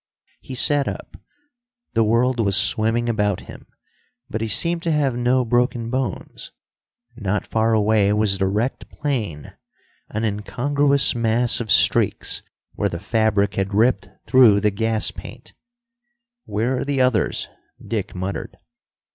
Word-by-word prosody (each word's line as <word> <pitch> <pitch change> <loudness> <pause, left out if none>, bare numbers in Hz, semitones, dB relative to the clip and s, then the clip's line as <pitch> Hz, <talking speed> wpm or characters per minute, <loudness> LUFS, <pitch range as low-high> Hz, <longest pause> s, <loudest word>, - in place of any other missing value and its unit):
He 130 - -9
sat 145 +2 +3
up. - - -7 0.8
The 115 - +2
world 120 +3 +1
was 100 -3 +2
swimming 110 +5 +2
about 105 -4 0
him, - - -13 0.6
but 110 - -3
he 115 - -1
seemed 170 +11 +3
to 165 - -1
have 145 -5 0
no 125 +1 +1
broken 120 0 0
bones. 130 0 -4 0.6
Not 105 -3 -2
far 110 0 +1
away 105 -1 +2
was 105 -2 +1
the 95 - +1
wrecked 110 +7 -2
plane, 110 - -4 0.6
an 110 +1 -4
incongruous 140 +7 +1
mass 120 +1 +1
of 115 -3 -5
streaks - - +2 0.3
where - - -1
the 85 - -5
fabric 105 0 0
had 95 0 -2
ripped 105 -3 +1 0.2
through 120 -6 +5
the 105 0 +1
gas 110 +2 0
paint. - - -12 0.9
"Where 115 +5 -1
are - - -2
the 140 -1 -2
others?" 125 -4 0 0.3
Dick 110 -5 -5
muttered. 95 +2 -5
115 Hz, 140 wpm, -21 LUFS, 105-125 Hz, 0.9 s, through